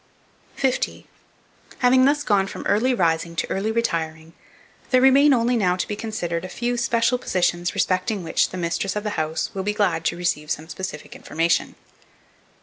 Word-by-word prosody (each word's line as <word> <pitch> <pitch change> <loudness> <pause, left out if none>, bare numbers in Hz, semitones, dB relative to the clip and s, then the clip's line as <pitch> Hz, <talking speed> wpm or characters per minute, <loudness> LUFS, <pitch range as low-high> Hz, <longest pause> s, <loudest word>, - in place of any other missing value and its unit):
50. 265 -2 -1 0.7
HAVING 255 +1 +4
THUS 290 +1 +2
GONE 195 -3 +2
FROM - - -8
EARLY 235 +6 +2
RISING 170 -3 0
TO - - -1
EARLY 205 +3 -1
RETIRING, 165 -8 -2 0.6
there 255 - +4
remain 270 +3 +6
only 245 -1 +2
now 185 -6 +2
to 180 - -3
be 210 - -3
considered 175 -6 -3
a 185 - -6
few 240 +5 -2
special 235 +1 +1
positions 175 -4 0
respecting 185 +2 0
which 165 - +1
the 185 - -7
mistress 180 +3 -2
of 210 - -2
the 210 - -2
house 160 -3 -2
will 195 - -3
be 210 +2 -2
glad 185 -6 +1
to 175 - 0
receive 155 -4 -2
some 155 - -3
specific 180 -4 -7
information. 165 +2 -1
195 Hz, 170 wpm, -23 LUFS, 170-235 Hz, 0.7 s, remain